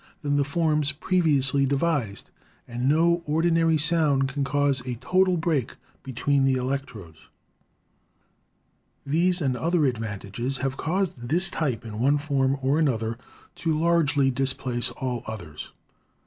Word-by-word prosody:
than 145 0 0
the 145 - +3
forms 150 0 +1
previously 145 -5 +2
devised, 135 -6 -1 0.4
and 125 +2 -1
no 170 +3 +3
ordinary 165 +1 +2
sound 150 -4 +2
can 140 +1 -2
cause 140 -1 +1
a 125 - -2
total 185 +8 +2
break 160 -7 -1 0.3
between 135 +2 0
the 135 -1 +3
electrodes. 125 - -5 1.8
These 175 +5 +1
and 135 -4 0
other 165 +3 +1
advantages 115 +1 -3
have 135 0 -2
caused 160 -7 -2
this 175 +4 +1
type 130 -9 -2
in 110 -1 -7
one 140 +4 +3
form 140 -2 0
or 140 +4 +2
another 115 -6 0 0.4
to 160 -2 0
largely 155 -5 +2
displace 130 -2 0
all 125 -3 -4
others. 85 -9 -7
140 Hz, 130 wpm, -25 LUFS, 125-160 Hz, 1.8 s, the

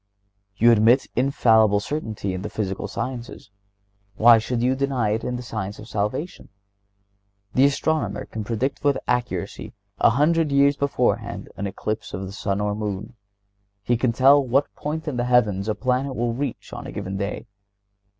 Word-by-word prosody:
You 120 +3 +6
admit 115 +4 +5
infallible 110 -5 +4
certainty 110 -7 -4
in 95 - -4
the 105 - -5
physical 100 -3 -3
sciences; 120 -5 -6 0.6
why 115 +2 +7
should 120 +1 -2
you 130 +1 +3
deny 130 -5 0
it 110 +1 -1
in 125 - -2
the 125 - -5
science 105 -4 -5
of 110 - -11
salvation? 105 - -3 1.0
The 130 - +5
astronomer 155 +2 0
can 110 - -6
predict 120 +7 -2
with 145 -2 +3
accuracy 125 0 -2 0.3
a - - +6
hundred 150 +5 +2
years 140 +1 +4
beforehand 115 -7 -1
an 100 - -3
eclipse 110 +3 -4
of 95 - -5
the 95 - -7
sun 100 -1 -2
or 105 0 0
moon. 105 +1 -4 0.7
He 120 - +1
can 120 +1 +1
tell 135 +4 +5
what 135 +3 +1
point 155 +2 -5
in 140 -5 -2
the 120 - 0
heavens 110 -5 +2
a 105 - 0
planet 130 +2 -1
will 120 0 -1
reach 135 0 -5
on - - -7
a - - -7
given 95 +1 -5
day. 100 +3 -4
120 Hz, 170 wpm, -23 LUFS, 105-135 Hz, 1.0 s, why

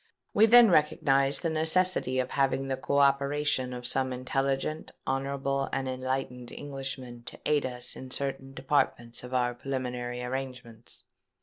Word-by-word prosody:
We 220 +2 +6
then 235 -2 +8
recognised 140 -3 +3
the 165 - 0
necessity 160 -3 +1
of 130 0 -1
having 135 0 +1
the 135 - 0
co 140 +2 -1
operation 140 -1 +2
of 125 -1 -6
some 130 +1 +1
intelligent, 135 +4 -2 0.2
honourable, 135 0 -1
and 135 - -2
enlightened 130 -1 -3
Englishman 135 -3 -6
to - - -10
aid 145 -3 +2
us 125 -1 -3
in 130 - -9
certain 135 0 -3
departments 130 -4 0
of 125 - -9
our 125 -1 +1
preliminary 125 -1 -4
arrangements. 125 -3 -7
135 Hz, 140 wpm, -29 LUFS, 125-140 Hz, 0.2 s, then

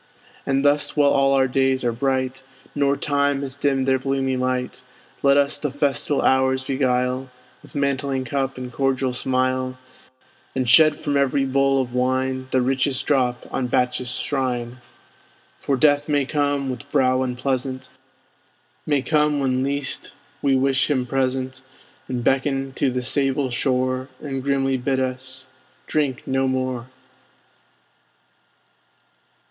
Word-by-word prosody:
And 135 +1 +1
thus 145 +1 +2
while 145 -1 +5
all 135 0 +3
our 135 -1 +3
days 130 0 +1
are 120 - +1
bright, 130 +1 -1 0.3
Nor 140 -1 +1
time 140 -1 0
has 135 -1 -5
dimmed 135 -2 0
their 130 0 +3
bloomy 135 0 -1
light, 125 0 -2 0.4
Let 140 0 +4
us 140 0 +2
the 150 - -2
festal 140 0 0
hours 130 0 +2
beguile 130 -1 0 0.3
With - - -15
mantling 140 -1 -1
cup 135 +1 -2
and 125 -1 -6
cordial 135 -1 0
smile; 130 0 -1 0.8
And 130 -2 0
shed 155 +5 +6
from 145 -2 -1
every 140 0 +2
bowl 135 0 +2
of 125 -2 -3
wine 130 +1 0
The 130 -1 +2
richest 135 +1 0
drop 125 -4 +1
on 125 - -1
Bacchus's 125 +1 0
shrine! 125 -3 -2 0.8
For 140 - 0
Death 145 +2 +3
may 145 -2 +2
come, 145 -2 0
with 140 +3 -9
brow 130 -2 +3
unpleasant, 130 +1 -2 1.0
May 145 -3 +1
come 150 -1 +2
when 130 -2 0
least 140 0 -2 0.3
we 140 -1 +3
wish 135 +1 +2
him 130 -4 +1
present, 130 0 -2 0.5
And 125 -2 -3
beckon 135 0 0
to 140 - +1
the 125 0 -2
sable 135 0 +1
shore, 130 +1 0
And 135 -3 -4
grimly 135 -1 +1
bid 130 +1 -1
us 130 0 -4 0.4
drink 140 -5 -1
no 135 0 0
more! 130 -2 -2
130 Hz, 140 wpm, -22 LUFS, 130-140 Hz, 1.0 s, shed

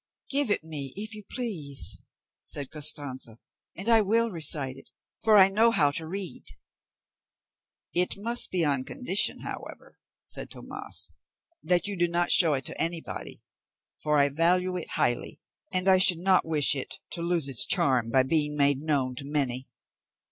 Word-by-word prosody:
"Give 280 -3 +1
it 205 - +1
me, 145 -4 -1
if 215 +2 -5
you 215 - -7
please," 170 - -3 0.4
said 140 -3 -8
Costanza, 140 -6 0 0.4
"and 195 +5 -5
I 225 -1 +5
will 225 +3 +1
recite 150 -6 0
it; 135 - -16 0.3
for 220 -1 +5
I 190 -1 +7
know 220 +4 +3
how 145 -11 +2
to 160 +2 -4
read." 190 +1 -6 1.5
"It 180 +1 +1
must 235 +4 0
be 175 -3 0
on 140 -3 0
condition, 215 - 0
however," - - -8 0.2
said - - -7
Tomas, - - -7 0.5
"that 180 -1 +1
you 205 -1 -3
do 175 -1 +1
not 175 +1 0
show 165 -4 +6
it 130 -1 -4
to - - -2
anybody; 165 0 -4 0.6
for 150 -1 +1
I 140 0 +3
value 180 +5 +1
it 180 - -5
highly, 120 - -1 0.3
and 185 +1 +1
I 190 -1 +5
should 185 -2 +4
not 185 -1 +2
wish 150 -3 +4
it 135 -2 -2 0.2
to 170 - -5
lose 170 -4 0
its 130 -4 +5
charm 125 -4 +2
by 130 +2 +3
being 150 +1 -1
made 140 -1 +3
known 140 -4 -1
to - - -3
many." 135 -3 -2
165 Hz, 165 wpm, -27 LUFS, 140-190 Hz, 1.5 s, I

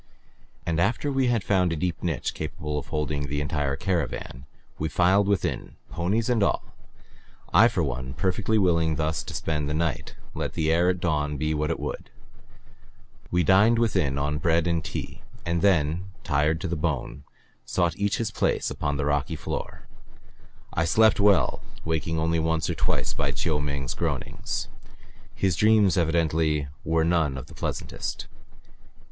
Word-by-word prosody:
And 85 0 0
after 120 +9 +1
we 135 -2 +2
had 120 -4 +1
found 90 -3 +2
a - - 0
deep 85 +2 -2
niche 80 -8 -2
capable 75 -1 -4
of - - -9
holding 75 -2 -2
the 75 +1 -2
entire 75 -1 -1
caravan 70 -5 -3 0.3
we 80 - -1
filed 95 +4 +3
within, 100 -1 -1 0.2
ponies 100 +7 0
and 120 -3 +2
all, 100 - +2 0.9
I - - +8
for - - 0
one 65 0 -4
perfectly 95 +8 +1
willing 85 -5 +3
thus 80 +1 -1
to - - -8
spend 75 -2 -1
the 75 - -1
night, 80 -5 -2 0.2
let - - -3
the 80 -1 +1
air 85 +2 +3
at 90 -1 -1
dawn 75 -3 0
be 75 +2 0
what 75 0 -1
it - - -1
would. - - -5 1.2
We 90 0 +2
dined 100 +7 +5
within 95 -12 +1
on 75 +1 -1
bread 85 +2 +2
and 85 -2 0
tea, - - -6 0.2
and 85 0 0
then, 85 -2 +2 0.2
tired 75 +3 +1
to - - -2
the 85 - -1
bone, 75 -3 -2 0.4
sought 85 -2 0
each 100 0 0
his 115 -2 -2
place - - 0
upon 70 -1 -2
the 70 - -1
rocky 75 -2 0
floor. - - -5 0.9
I 85 - +1
slept 110 +6 +4
well, 100 -2 +3 0.2
waking 80 0 -1
only 80 +1 +1
once 80 0 0
or - - -1
twice - - 0
by - - -1
Chiu 75 -3 0
Ming's 70 -2 -2
groanings; - - -3 0.7
his 95 -3 +1
dreams 105 -1 +4
evidently 80 -4 +1
were 80 0 +2
none 80 -5 +1
of 65 - -6
the - - -14
pleasantest. - - -4
80 Hz, 165 wpm, -26 LUFS, 75-90 Hz, 1.2 s, I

